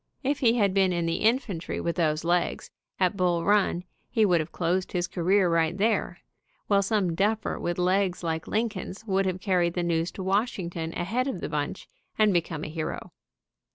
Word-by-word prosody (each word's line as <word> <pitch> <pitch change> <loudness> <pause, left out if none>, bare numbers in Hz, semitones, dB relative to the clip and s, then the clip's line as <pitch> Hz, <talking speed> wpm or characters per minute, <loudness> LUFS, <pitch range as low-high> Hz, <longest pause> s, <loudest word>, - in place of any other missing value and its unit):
If 280 +2 0
he 235 -2 +4
had 200 -4 +2
been 190 -1 +3
in 170 -1 0
the 165 0 0
infantry 220 -7 0
with 170 - -2
those 155 -3 +1
legs, 175 +1 0 0.3
at 185 0 +2
Bull 175 -3 +1
Run, 200 -3 +2 0.3
he 220 -2 +3
would 180 -4 +3
have 155 - -4
closed 180 +2 -1
his 175 -1 0
career 185 +2 +2
right 165 +1 +1
there, 220 +3 +1 0.5
while 200 -1 +3
some 195 -3 +1
duffer 210 +5 0
with 175 0 -2
legs 185 0 +1
like 160 -1 -2
Lincoln's 215 -2 -3
would 195 -2 +1
have 185 0 -2
carried 180 -3 +1
the 175 - 0
news 170 0 0
to 190 - -6
Washington 185 -5 -1
ahead 235 +9 -1
of 230 -10 -3
the - - -4
bunch 150 +3 -3 0.3
and 215 -2 +4
become 165 -3 -1
a - - -4
hero. 155 0 -5
185 Hz, 190 wpm, -27 LUFS, 170-205 Hz, 0.5 s, he